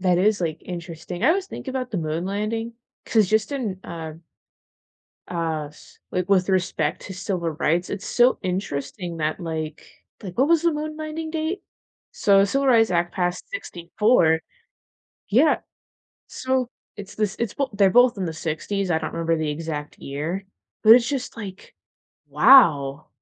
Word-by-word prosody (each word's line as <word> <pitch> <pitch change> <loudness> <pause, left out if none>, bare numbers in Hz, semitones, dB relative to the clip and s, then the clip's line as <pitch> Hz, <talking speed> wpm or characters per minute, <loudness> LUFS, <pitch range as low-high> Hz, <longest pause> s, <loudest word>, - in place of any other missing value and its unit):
that 180 -2 +3
is, 205 +2 +2
like, 160 -3 -3
interesting, 175 0 -6
I - - +6
always 385 +2 +1
think - - -8
about 260 -1 -3
the 205 - -3
moon 160 +2 -2
landing 220 +4 -3 0.3
'cause 215 -4 +3
just 220 +6 +1
in, 220 -10 -3
uh 160 -2 -7 1.1
uh, 160 -3 -2
c 150 - -18
like, 180 +1 -1
with 190 -2 +3
respect 180 -3 0
to 190 - -8
civil 180 -3 -2
rights, 165 +3 0
it's 195 -1 -5
so 245 +1 +3
interesting 180 -1 -3
that, 155 +3 -2
like, 160 -2 -5 0.4
like 190 +2 -8
what 270 - +4
was 335 -1 +4
the 335 -1 +3
moon 305 +1 -4
landing 315 +1 -5
date? 320 +4 -2 0.5
So 195 -2 +4
Civil 275 +6 +1
Rights 225 -4 +5
Act 175 0 0
passed 180 - -2
'64 175 - +1 0.9
Yeah, 275 +9 +4 0.7
so, 260 -1 -1 0.3
it's 200 -2 -9
this 210 -2 -1
it's 235 -4 -2
well 275 -2 0
they're 200 -1 +4
both 245 +2 +5
in 190 - -2
the 165 - -3
'60s, 170 +5 -3
I 160 - +3
don't 160 - -4
remember 165 0 0
the 155 -1 -1
exact 150 -1 -5
year, 160 +8 -4 0.4
but 220 +1 +10
it's 240 -1 +2
just 270 -3 -3
like, 195 -4 -9 0.5
"Wow," 150 - +5
190 Hz, 165 wpm, -23 LUFS, 165-235 Hz, 1.1 s, but